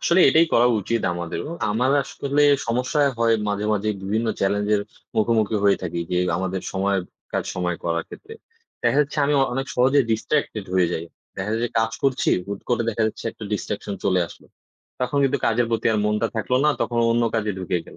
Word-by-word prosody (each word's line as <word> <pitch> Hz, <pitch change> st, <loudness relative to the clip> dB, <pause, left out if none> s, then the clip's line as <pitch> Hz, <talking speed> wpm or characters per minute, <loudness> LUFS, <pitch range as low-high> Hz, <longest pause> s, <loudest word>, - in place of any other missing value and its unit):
আসলে 170 Hz, +2 st, +3 dB
এটাই 160 Hz, +5 st, +5 dB
করা 120 Hz, +1 st, +5 dB
উচিত 115 Hz, +4 st, -1 dB
আমাদেরও। 85 Hz, -, -4 dB, 0.2 s
আমার 125 Hz, +5 st, +1 dB
আসলে 140 Hz, +2 st, -1 dB, 0.2 s
সমস্যা 125 Hz, +6 st, 0 dB, 0.2 s
হয় 115 Hz, -1 st, +3 dB
মাঝে, 105 Hz, 0 st, -1 dB
মাঝে, 105 Hz, 0 st, 0 dB
বিভিন্ন 110 Hz, +4 st, -1 dB
চ্যালেঞ্জের 105 Hz, +1 st, +1 dB, 0.4 s
মুখোমুখি 110 Hz, -1 st, +2 dB
হয়ে 100 Hz, -1 st, +5 dB
থাকি 85 Hz, -1 st, -3 dB
যে, 90 Hz, -, +1 dB, 0.2 s
আমাদের 95 Hz, +1 st, -2 dB
সময়ের 95 Hz, 0 st, 0 dB, 0.3 s
কাজ, -, -, -1 dB
সময়ে 90 Hz, -1 st, -1 dB
করার 85 Hz, -1 st, -1 dB
ক্ষেত্রে। 425 Hz, -, -11 dB, 0.5 s
দেখা -, -, +2 dB
যাচ্ছে, 145 Hz, +1 st, -2 dB
আমি 145 Hz, -, +1 dB
অ -, -, +5 dB
অনেক 135 Hz, +2 st, -2 dB
সহজে 130 Hz, +3 st, +4 dB
distracted 110 Hz, -2 st, -1 dB
হয়ে 90 Hz, -1 st, +4 dB
যাই। 80 Hz, -, -3 dB, 0.3 s
দেখা 95 Hz, +2 st, -3 dB
যায় 110 Hz, -, 0 dB
যে, -, -, -1 dB
কাজ 110 Hz, 0 st, +1 dB
করছি, 135 Hz, -2 st, +2 dB, 0.2 s
হুটকরে 110 Hz, +4 st, -2 dB
দেখা 115 Hz, 0 st, -1 dB
যাচ্ছে 110 Hz, -, -5 dB
একটা 110 Hz, -, -10 dB
distraction 100 Hz, 0 st, -3 dB
চলে 95 Hz, -2 st, +3 dB
আসলো। -, -, -15 dB, 0.5 s
তখন 125 Hz, +3 st, 0 dB
কিন্তু 135 Hz, -, +1 dB
কাজের 115 Hz, +1 st, +2 dB
প্রতি 115 Hz, -, 0 dB
আর 110 Hz, -, +1 dB
মনটা 105 Hz, 0 st, +1 dB
থাকলো 120 Hz, +3 st, 0 dB
না, 150 Hz, -, +5 dB
তখন 120 Hz, -, 0 dB
অন্য 120 Hz, +1 st, +2 dB
কাজে 105 Hz, -1 st, 0 dB
ঢুকে 90 Hz, -1 st, -1 dB
গেল। -, -, -13 dB
110 Hz, 190 wpm, -23 LUFS, 100-125 Hz, 0.5 s, এটাই